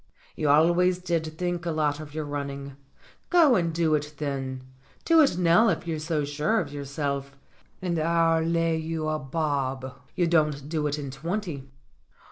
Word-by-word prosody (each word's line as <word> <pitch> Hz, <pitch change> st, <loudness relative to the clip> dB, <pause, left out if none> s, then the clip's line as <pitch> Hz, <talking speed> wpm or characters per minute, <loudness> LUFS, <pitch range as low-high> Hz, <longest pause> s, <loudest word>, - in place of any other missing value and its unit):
"You 150 Hz, -, 0 dB
always 175 Hz, +5 st, +4 dB
did 165 Hz, -3 st, -2 dB
think 175 Hz, -1 st, -2 dB
a 170 Hz, -, -2 dB
lot 150 Hz, -2 st, 0 dB
of 155 Hz, -1 st, -9 dB
your 155 Hz, -1 st, -2 dB
running. 140 Hz, -1 st, -5 dB, 0.5 s
Go 330 Hz, -8 st, +6 dB
and 170 Hz, -4 st, +1 dB
do 160 Hz, -1 st, +1 dB
it 150 Hz, 0 st, -1 dB
then. 135 Hz, -3 st, -3 dB, 0.4 s
Do 330 Hz, -1 st, +6 dB
it 275 Hz, -, +3 dB
now 180 Hz, +6 st, +5 dB
if -, -, -1 dB
you're 165 Hz, -2 st, -2 dB
so 155 Hz, -1 st, -1 dB
sure 150 Hz, +10 st, 0 dB
of 145 Hz, -, -4 dB
your 140 Hz, -1 st, -5 dB
self, 140 Hz, -1 st, -3 dB, 0.5 s
and 170 Hz, -3 st, 0 dB
I'll 165 Hz, 0 st, +2 dB
lay 165 Hz, 0 st, +1 dB
you 160 Hz, 0 st, -3 dB
a 155 Hz, 0 st, -1 dB
bob 135 Hz, -3 st, -2 dB, 0.2 s
you 175 Hz, -, +2 dB
don't 150 Hz, -4 st, +1 dB
do 155 Hz, -1 st, -1 dB
it 145 Hz, +1 st, -2 dB
in 140 Hz, -2 st, -5 dB
twenty." 160 Hz, -1 st, -4 dB
155 Hz, 175 wpm, -26 LUFS, 145-170 Hz, 0.5 s, Go